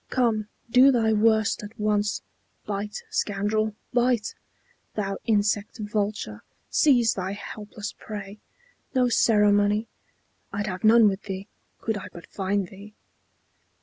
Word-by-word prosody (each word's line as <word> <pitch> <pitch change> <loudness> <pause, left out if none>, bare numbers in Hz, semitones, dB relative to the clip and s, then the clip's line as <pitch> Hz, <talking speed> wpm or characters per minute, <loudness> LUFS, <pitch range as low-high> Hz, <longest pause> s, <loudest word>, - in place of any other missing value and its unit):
Come, 225 -4 +1 0.2
do 255 +3 +7
thy 225 -3 +2
worst 220 0 +3
at 210 +2 -10
once. 210 0 0 0.4
Bite, 210 +1 -4
scoundrel, 210 +1 0 0.2
bite! 245 -2 +2 0.6
Thou 195 -2 -2
insect 210 0 +1
vulture, 205 - -3 0.3
seize 245 -6 +4
thy 190 0 -3
helpless 210 +1 -7
prey! 205 -1 -7 0.6
No 250 -1 +4
ceremony! 210 -1 +3 0.7
(I'd 200 +1 -2
have 185 -3 -5
none 225 0 +7
with 195 0 0
thee, 195 0 -5 0.3
Could 220 -2 -1
I - - -8
but 170 - -11
find 195 -1 -2
thee.) 205 +2 -13
210 Hz, 120 wpm, -25 LUFS, 200-220 Hz, 0.7 s, do